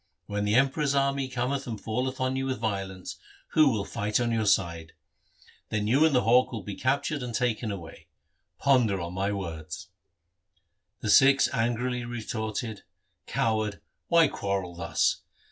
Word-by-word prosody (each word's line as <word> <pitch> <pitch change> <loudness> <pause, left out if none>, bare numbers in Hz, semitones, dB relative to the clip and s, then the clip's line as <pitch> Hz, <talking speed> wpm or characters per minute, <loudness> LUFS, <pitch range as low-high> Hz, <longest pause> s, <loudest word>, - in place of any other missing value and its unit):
When 105 0 -2
the 105 +1 +2
Emperor's 140 +2 +2
army 140 -1 +1
cometh 130 +2 -2
and 110 -3 -4
falleth 125 +5 -2
on 130 0 0
you 135 0 -1
with 130 -1 -1
violence, 95 -4 -4 0.3
who 155 -2 +5
will 105 -5 -1
fight 105 +2 -1
on 120 -1 0
your 110 -2 0
side? 85 -5 +1 0.8
Then 105 -1 -1
you 130 +8 +4
and 155 -4 +3
the 125 - +3
hawk 125 +3 +4
will 115 -3 -5
be 100 - -5
captured 140 +5 0
and 120 -2 -4
taken 120 -3 0
away. 85 -5 -9 0.5
Ponder 120 -8 +3
on 85 0 -5
my 100 +2 -1
words.' 85 -2 -6 1.1
The 105 - +1
Sikhs 135 +3 +6
angrily 120 +1 0
retorted, 110 -2 -4 0.3
' - - -48
Coward, 110 -2 0 0.3
why 170 -2 +5
quarrel 100 -7 -3
thus 85 - 0
115 Hz, 160 wpm, -27 LUFS, 100-130 Hz, 1.1 s, Sikhs